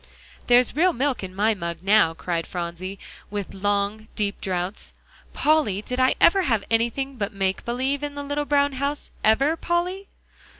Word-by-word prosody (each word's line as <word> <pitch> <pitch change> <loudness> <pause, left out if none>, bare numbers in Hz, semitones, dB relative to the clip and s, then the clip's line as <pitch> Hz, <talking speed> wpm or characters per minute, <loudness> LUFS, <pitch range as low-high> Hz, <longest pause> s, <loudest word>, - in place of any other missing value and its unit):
"There's 245 +1 +4
real 355 +4 +3
milk 270 -4 -1
in 185 0 -7
my 215 +3 +3
mug 170 -3 -5
now," 195 -5 +4
cried 165 -1 -3
Phronsie, 180 +2 -5 0.3
with 205 -2 -5
long, 205 +2 -1
deep 205 -1 -2
draughts. 185 +1 -3 0.4
"Polly, 290 -11 +2
did 250 +3 -4
I 255 0 +4
ever 385 +3 +6
have 230 - +1
anything 235 +4 0
but 200 -2 -2
make 195 -1 -1
believe 260 +4 -1
in 290 -1 -4
the 285 - -4
little 290 +1 -2
brown 285 -1 +2
house; 280 +2 -3
ever, 275 +9 +4
Polly?" 355 +4 -2
225 Hz, 165 wpm, -24 LUFS, 195-285 Hz, 0.4 s, ever